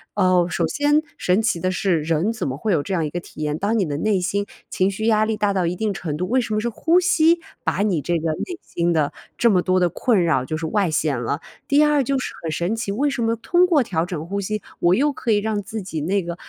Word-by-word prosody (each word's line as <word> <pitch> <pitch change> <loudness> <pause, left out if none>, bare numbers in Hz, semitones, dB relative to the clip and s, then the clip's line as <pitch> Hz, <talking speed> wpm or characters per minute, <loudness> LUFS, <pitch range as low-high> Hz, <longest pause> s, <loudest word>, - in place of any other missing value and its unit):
呃， 185 -3 +3
首 170 0 0
先 290 - +2 0.2
神 180 +2 +2
奇 215 -6 +1
的 185 - 0
是 185 -3 +1
人 165 +7 0
怎 220 - -3
么 130 0 -3
会 215 +8 -1
有 150 - +2
这 195 - -4
样 165 -3 0
一 - - -3
个 175 - -3
体 170 - -11
验， 150 0 -1
当 210 +3 +1
你 200 - +2
的 145 -3 -3
内 200 +4 +1
心 200 +3 -1 0.2
情 190 +1 +2
绪 220 +3 -4
压 215 -1 +4
力 220 -1 -1
大 205 -1 +1
到 185 -3 +1
一 175 - -1
定 210 +1 -1
程 150 -5 -4
度， 180 - -2
为 255 +4 +2
什 220 - -4
么 - - +1
是 235 +2 -1
呼 330 +10 +2
吸 340 -1 +3 0.2
把 - - -1
你 185 -7 +1
这 175 +3 0
个 160 0 -1
内 350 - -4
心 170 0 -1
的 155 -3 +1 0.2
这 235 -1 +4
么 180 -3 +3
多 185 0 +2
的 180 - +3
困 200 +1 +1
扰 155 -6 +2
就 155 +4 -3
是 160 - -4
外 195 +2 +1
显 150 -4 0
了？ 140 +5 -2 0.3
第 285 +2 +4
二 295 -2 +3
就 275 +1 0
是 255 - -4
很 165 -2 -3
神 175 +7 -1
奇， 225 -3 -3
为 265 +9 0
什 275 -3 -3
么 230 0 +1
通 350 +10 +2
过 305 -7 +3
调 165 -7 -1
整 165 -4 -5
呼 200 +2 -2
吸， 215 +2 -3 0.2
我 175 +1 +4
又 285 +5 +2
可 255 - -5
以 210 - +4
让 210 0 -1
自 215 +2 -6
己 165 -4 -4
那 190 +5 0
个 170 0 -5
195 Hz, 300 characters per minute, -22 LUFS, 170-225 Hz, 0.3 s, 压